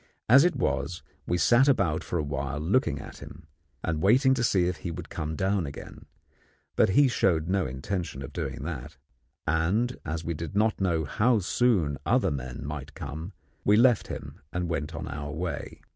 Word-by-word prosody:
As 135 +5 +8
it 175 - +2
was, 70 +5 -1 0.2
we 90 - +1
sat 120 - +5
about 100 - +2
for 90 - -2
a 80 - 0
while 70 0 -3
looking 85 - +1
at - - -10
him, - - -11 0.4
and 80 -2 -1
waiting 130 - +5
to 125 -2 0
see 95 -6 +3
if 90 +1 -1
he 90 - -5
would 85 0 -7
come 80 -1 -3
down 95 -1 0
again; 70 - -10 0.7
but - - +4
he 140 +9 +5
showed 85 -9 +1
no 95 -2 +1
intention 70 +2 -4
of - - -8
doing - - -4
that, 75 -2 -6 0.5
and, 95 +10 +1
as 80 +1 -4
we 85 - -1
did 85 +5 -6
not 110 0 +2
know 85 -4 +1
how 115 - +2
soon 90 - +1
other 125 -2 +2
men 65 -2 -5
might 75 0 -6
come, 80 +7 -6 0.3
we 105 +1 +5
left 120 -1 +4
him - - -7
and 90 -1 -2
went 80 -1 -3
on - - -5
our 75 0 -5
way. 85 +2 -5
85 Hz, 190 wpm, -27 LUFS, 75-105 Hz, 0.7 s, As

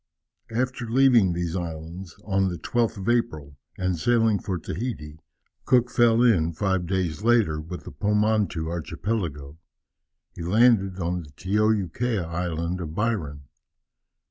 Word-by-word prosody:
After 120 0 -2
leaving 120 -6 +5
these 85 0 -3
islands, 85 +1 -6
on 95 -2 +1
the 90 - -4
12th 115 +6 -1
of 95 - -6
April, 80 -13 0 0.2
and 90 -3 -1
sailing 115 0 +3
for 95 -3 -3
Tahiti, 80 -4 -5 0.5
Cook 125 -1 +3
fell 120 0 +4
in, 85 -9 +3
five 95 0 -1
days 95 -2 -1
later, 110 -10 +3
with 85 +3 -8
the - - -9
Pomotou 105 -5 0
archipelago. 85 -3 -4 0.8
He - - -8
landed 95 0 +3
on 90 0 -1
the 75 - -13
Tioukea 105 - 0
Island 85 +1 -3
of 80 -2 -6
Byron. 85 -10 -2
95 Hz, 130 wpm, -25 LUFS, 85-115 Hz, 0.8 s, leaving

